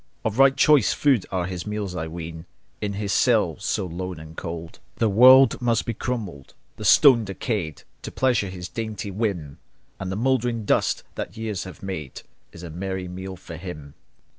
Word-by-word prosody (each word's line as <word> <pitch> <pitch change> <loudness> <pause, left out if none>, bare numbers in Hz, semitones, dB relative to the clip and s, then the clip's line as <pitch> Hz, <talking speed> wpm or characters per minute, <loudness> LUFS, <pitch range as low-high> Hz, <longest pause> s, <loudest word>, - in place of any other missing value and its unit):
Of 110 +3 -1
right 135 0 +6
choice 150 -7 +5
food 135 -9 +2
are 90 -2 -1
his 90 0 -5
meals, 105 -3 -3
I 80 -2 -3
ween, 80 0 -7 0.3
In 105 -1 -2
his 100 -1 -2
cell - - +3
so - - -1
lone 90 0 -5
and 80 +1 -11
cold. 85 0 -7 0.2
The 115 - +1
walls 130 +5 +7
must 115 -2 +1
be 115 - -2
crumbled, 105 - -5 0.2
the 105 - -6
stones 120 +2 +6
decayed. 95 - -3 0.2
To - - -7
pleasure 120 -7 +1
his 90 -1 -7
dainty 110 -3 -5
whim; 95 -9 -3 0.4
And 95 -1 -4
the - - -2
mouldering 120 -1 0
dust - - +1
that 95 - -6
years 110 -5 -3
have 95 - -11
made 80 -9 -6 0.3
Is 85 - -12
a 85 - -7
merry 95 +2 -4
meal 95 +1 -7
for 85 -2 -10
him. 75 -5 -8
95 Hz, 180 wpm, -24 LUFS, 85-115 Hz, 0.4 s, walls